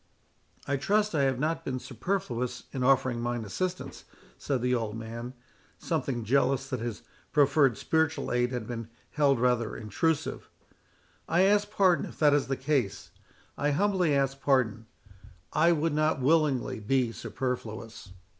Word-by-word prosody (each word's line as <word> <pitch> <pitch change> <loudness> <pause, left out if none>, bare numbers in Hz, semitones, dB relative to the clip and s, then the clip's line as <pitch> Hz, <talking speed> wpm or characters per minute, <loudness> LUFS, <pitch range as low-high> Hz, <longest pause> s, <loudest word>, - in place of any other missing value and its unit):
"I 140 - +1
trust 210 +8 +1
I 140 -3 +2
have 130 -2 +1
not 160 +4 -1
been 130 -4 -3
superfluous 125 - -3
in 130 - -3
offering 130 -2 +2
mine 120 -1 -2
assistance," 185 - -4 0.3
said 130 -4 -2
the 125 0 +2
old 115 -3 -2
man, 115 +3 -7 0.4
something 135 -7 -2
jealous 135 +3 +1
that 130 -3 -2
his 115 -2 -5 0.3
proffered 140 -4 +4
spiritual 160 -1 0
aid 125 0 +1
had 125 -3 -3
been 115 -1 -6 0.2
held 140 -4 +2
rather 120 -2 +1
intrusive. 145 +9 -2 0.8
"I 175 +3 +4
ask 205 +1 +3
pardon 190 -4 +3
if - - -12
that 150 -2 +4
is 145 -1 +2
the 135 -1 -1
case, 130 -6 -1 0.4
I 145 - 0
humbly 180 -1 +2
ask 135 0 0
pardon—I 110 - -1
would 165 -1 +1
not 155 -1 +1
willingly 140 -4 +2
be 120 +2 +1
superfluous." 115 -3 -5
135 Hz, 145 wpm, -28 LUFS, 120-155 Hz, 0.8 s, proffered